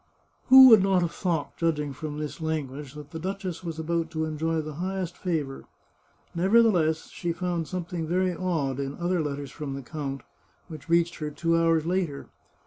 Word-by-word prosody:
" - - -41
Who 265 0 +11
would 220 -4 +8
not 190 -2 +3
have 170 - -1
thought, 170 -6 -2
judging 150 -4 0
from 150 +2 -6
this 150 +1 -5
lan 160 -2 -1
guage, 135 +1 -9
that 150 -1 -10
the 160 - -6
duchess 185 -1 -4
was 165 -2 -5
about 165 +1 -1
to 160 0 -2
enjoy 160 +1 -1
the 155 0 -7
highest 185 -2 -3
fa 170 -5 -1
vour? 135 -1 -9 0.7
Nevertheless, 180 -4 +3
she 175 - -3
found 175 -2 -2
something 175 -2 -4
very 180 +2 +1
odd 155 -7 -1
in 140 0 -3
other 175 0 0
letters 140 -2 -4
from 140 -3 -5
the 140 - -7
count, 140 0 -5 0.5
which 155 -1 -10
reached 170 0 +2
her 150 -1 -3
two 165 +3 0
hours 165 -1 +3
later. 170 -5 -2
165 Hz, 190 wpm, -26 LUFS, 150-180 Hz, 0.7 s, Who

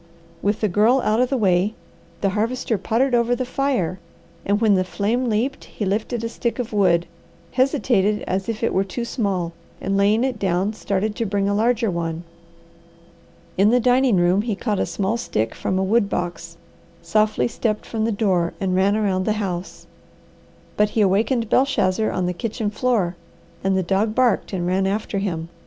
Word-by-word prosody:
With 205 +1 0
the 215 - +3
Girl 215 +7 +3
out 215 0 +1
of 250 0 +2
the 270 - 0
way, 195 -1 +2 0.5
the 195 - +2
Harvester 225 +4 -1
pottered 245 +6 +1
over 240 0 +3
the 255 +1 -2
fire, 250 - -1 0.4
and 205 +1 +1
when 220 -2 +4
the 185 -1 +3
flame 220 +7 -1
leaped 230 +6 -1
he 210 - -5
lifted 220 +4 -2
a - - -1
stick 235 0 -3
of 245 -3 -4
wood, 175 -4 +3 0.5
hesitated 245 -6 +1
as 190 +3 -2
if 225 +1 -3
it - - +1
were 190 - +2
too 215 +5 -5
small, 195 -8 -2 0.3
and 195 +1 -2
laying 205 +4 +3
it 255 -4 -1
down, 190 +2 0
started 210 0 -2
to 230 - -1
bring 200 0 0
a 200 - +1
larger 230 0 +1
one. 165 -1 -3 1.4
In 200 +2 +5
the 245 +2 +4
dining 250 -1 +3
room 180 +2 +3
he 220 -1 -2
caught 210 -1 -2
a - - 0
small 190 +6 -1
stick 110 - -2
from 185 - -2
the 190 - +1
wood 205 +1 +2
box, 170 -2 -4 0.5
softly 215 - +2
stepped 215 - -2
from 220 -1 -3
the 230 - +1
door, 190 -5 +1
and 190 -2 -1
ran 195 +2 +3
around 190 -3 0
the 215 - +2
house. 190 -4 -4 0.9
But 210 0 +3
he - - +4
awakened 220 +5 +2
Belshazzar 220 -6 +2
on 185 - -1
the 180 - -1
kitchen 210 +3 -3
floor, 215 -6 0 0.5
and 190 0 +2
the 190 - +1
dog 200 +5 0
barked 250 -4 +2
and 180 -3 -2
ran 190 +2 +1
after 200 0 -2
him. 170 -4 -3
205 Hz, 185 wpm, -22 LUFS, 190-230 Hz, 1.4 s, In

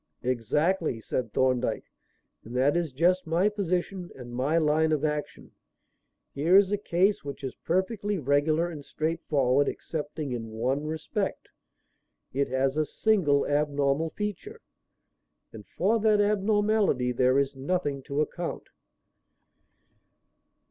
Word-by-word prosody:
"Exactly," 130 - 0
said 115 0 -3
Thorndyke. 130 0 +1 0.6
"And 120 +3 -9
that 135 +4 +3
is 170 -4 0
just 175 +6 +2
my 175 +6 +2
position 185 -2 -2
and 120 -2 -10
my 135 +6 +1
line 155 0 +2
of 155 -1 +1
action. 150 -1 -4 0.8
Here 165 +7 +4
is 200 -1 +4
a 205 - +2
case 195 +1 +1
which 140 -1 -7
is 130 - -4
perfectly 200 +3 -1
regular 155 +3 +2
and 155 -4 -8
straightforward 145 -4 0
excepting 150 -2 -5
in 115 -2 -5
one 130 +7 -1
respect. 160 +6 -3 0.8
It 140 +1 +1
has 135 +2 0
a 155 - +2
single 175 -11 +2
abnormal 145 +1 +1
feature. 210 +1 -5 0.9
And 105 -2 -11
for 215 +6 +1
that 215 -1 +3
abnormality 205 - +2
there 130 +2 +3
is 140 0 +1
nothing 145 0 -2
to 140 +2 0
account. 170 +3 -4
155 Hz, 125 wpm, -27 LUFS, 135-185 Hz, 0.9 s, Here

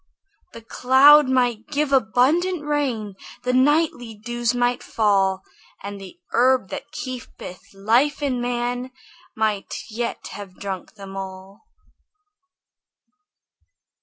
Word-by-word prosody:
The 230 - -11
clouds 265 +4 +6
might 245 -3 +1
give 300 -1 -1
abundant 290 +8 +2
rain, 260 -9 -1 0.3
The 250 0 0
nightly 260 -4 +2
dews 240 +2 -2
might 245 0 +1
fall, 195 -3 +1 0.4
And 200 0 -7
the 195 - -11
herb 250 -5 +3
that - - -7
keepeth 250 -8 -8
life 240 +9 +1
in 255 -4 -1
man 245 +1 -2 0.5
Might 215 -2 -1 0.2
yet 235 +2 -4
have 195 -3 -10
drunk 195 -1 -6
them 195 -2 -10
all. 190 - -9
240 Hz, 105 wpm, -22 LUFS, 205-260 Hz, 0.5 s, clouds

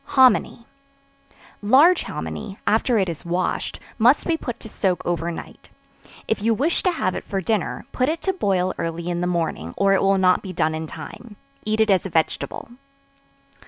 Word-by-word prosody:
Hominy. 255 -2 +4 1.0
Large 285 - +5
hominy, 200 -2 -6
after 225 +3 +2
it 195 -3 +2
is 170 -1 -5
washed; 175 +1 -2 0.2
must 245 +6 +4
be 335 - +1
put 245 -7 -6
to - - -8
soak 190 -4 -1
over 170 -1 -1
night; 170 - -9 0.6
if 220 - -1
you 225 +1 +2
wish 300 +9 0
to 370 - +2
have 185 - -1
it - - -5
for 195 - -3
dinner, 205 +1 -2
put 255 +2 +1
it 325 +1 -1
to 385 - +1
boil 185 - 0
early 165 +1 -3
in 175 0 -2
the 180 - 0
morning, 165 - -2
or 195 0 +3
it 195 - +3
will 195 0 +3
not 185 -1 +3
be 190 -2 -7
done 160 -2 +1
in 160 0 -4
time; 215 +6 -10 0.3
eat 215 0 0
it 220 -1 +4
as 190 -3 +3
a - - -9
vegetable. 160 +6 -1
195 Hz, 190 wpm, -22 LUFS, 175-230 Hz, 1.0 s, Large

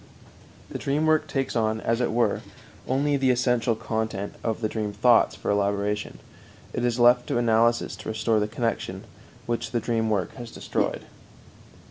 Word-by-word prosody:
The - - -4
dream 145 +3 0
work 155 0 +3
takes 135 -2 -2
on, 110 -1 +1
as 115 +2 0
it 125 - +1
were, 115 -2 +1 0.5
only 140 +2 +1
the 135 -1 +2
essential 125 -2 +2
content 110 -2 -3
of 115 0 -2
the 110 - +1
dream 105 -1 -3
thoughts 115 +3 +4
for - - -2
elaboration. 100 +1 -1 0.6
It - - -2
is 120 -1 +1
left 120 +1 +5
to - - 0
analysis 115 -1 +2
to 110 - -7
restore 110 0 +1
the 105 - 0
connection 115 +1 -3 0.4
which 120 -1 -2
the 120 - 0
dream 115 -1 0
work 100 -5 -1
has 120 -2 -7
destroyed. - - -2
115 Hz, 165 wpm, -25 LUFS, 110-125 Hz, 0.6 s, left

